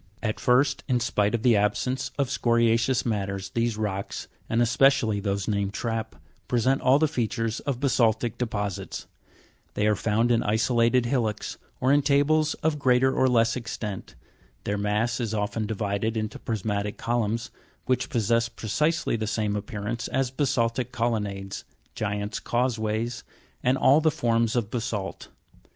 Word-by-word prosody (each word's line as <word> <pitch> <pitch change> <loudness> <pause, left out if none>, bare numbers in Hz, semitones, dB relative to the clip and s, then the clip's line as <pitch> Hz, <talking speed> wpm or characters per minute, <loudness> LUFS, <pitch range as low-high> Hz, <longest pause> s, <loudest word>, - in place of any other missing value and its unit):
16. 110 - +1
At - - -10
first, 135 +2 +2
in 125 -1 +2
spite 105 -2 +1
of 115 - -3
the 120 -3 +5
absence 105 +6 0
of 140 -2 +1
scoria'ceous 115 0 +2
matters, 100 -3 -2
these 115 -1 0
rocks, 100 -2 -3 0.2
and 115 - +1
especially 120 -2 +3
those 100 -1 -2
named 100 -1 -1
trap, 115 -1 -3 0.3
present 130 +2 +2
all 130 +2 +5
the 155 +1 +3
features 115 -5 -2
of 135 -4 -3
basaltic 120 -4 +2
deposits; 105 -5 -3 0.7
they 105 - +1
are 105 0 +3
found 115 +4 +1
in 115 - +3
isolated 115 +3 +2
hillocks, 120 -4 -1 0.2
or 130 +2 +3
in 145 - +5
tables 150 +2 +2
of 155 -1 +1
greater 130 -1 +3
or 130 - +3
less 115 -2 +3
extent; 105 -4 -5 0.5
their 100 - -1
mass 105 +4 0
is 110 -3 -2
often 105 +1 -2
divided 110 +1 -1
into 110 0 -3
prismatic 105 -1 -2
columns, 115 0 -1 0.3
which 130 - 0
possess 115 +1 +1
precisely 150 +8 0
the 110 -1 -2
same 105 -1 -1
appear 105 0 -5
ance 115 +2 -3
as 130 -1 -1
basaltic 125 -3 0
colonnades, 105 -4 -2 0.3
giants' 105 0 -3
causeways, 115 -1 -1 0.4
and 125 +2 +2
all 140 +4 +5
the 160 - +4
forms 115 -4 +1
of 115 -3 -1
basa'lt. 110 -5 -4
115 Hz, 150 wpm, -26 LUFS, 105-125 Hz, 0.7 s, the